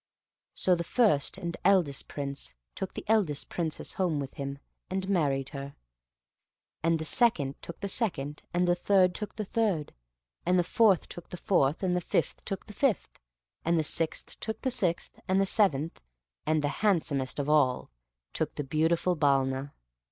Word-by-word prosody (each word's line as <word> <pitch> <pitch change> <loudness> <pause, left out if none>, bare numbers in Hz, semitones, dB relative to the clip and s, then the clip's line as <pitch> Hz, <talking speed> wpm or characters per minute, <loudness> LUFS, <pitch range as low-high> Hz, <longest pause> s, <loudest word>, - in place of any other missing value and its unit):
So 185 - +3
the 170 -1 0
first 180 - +2
and 170 -3 -4
eldest 180 -8 +3
Prince 140 - -5 0.2
took 190 - -5
the - - -6
eldest 200 -10 +1
Princess 165 -3 -3
home 175 -6 0
with 135 -1 -5
him, 140 0 -5 0.3
and 190 +1 -2
married 140 -8 +1
her. 140 -1 -7 1.1
And 165 +1 +2
the 160 - -5
second 150 - +3
took 170 - -9
the 200 - -2
second; 150 - -1
and 175 +1 +1
third 185 -2 +4
took 210 +3 -5
the 215 - -3
third; 195 -8 0 0.5
and 180 +1 +3
the 175 - +4
fourth 205 0 +3
took 175 - -9
the 180 - -6
fourth; 155 -3 +1
and 180 -1 +1
the 180 - 0
fifth - - -1
took 195 -2 -4
the 210 - -11
fifth; 260 -1 0 0.4
and 170 +1 +2
the 160 - +2
sixth 160 +1 0
took 220 0 -5
the 260 - +1
sixth; 180 -8 -1
and 190 +1 +3
the 195 - +3
seventh, 165 -7 +2 0.5
and 155 -1 +2
the 145 - +1
handsomest 155 -10 +1
of 145 -1 -1
all, 145 -4 +2 0.4
took - - -2
the 145 - -2
beautiful 160 +5 +1
Balna. 135 -2 +1
170 Hz, 170 wpm, -29 LUFS, 145-190 Hz, 1.1 s, third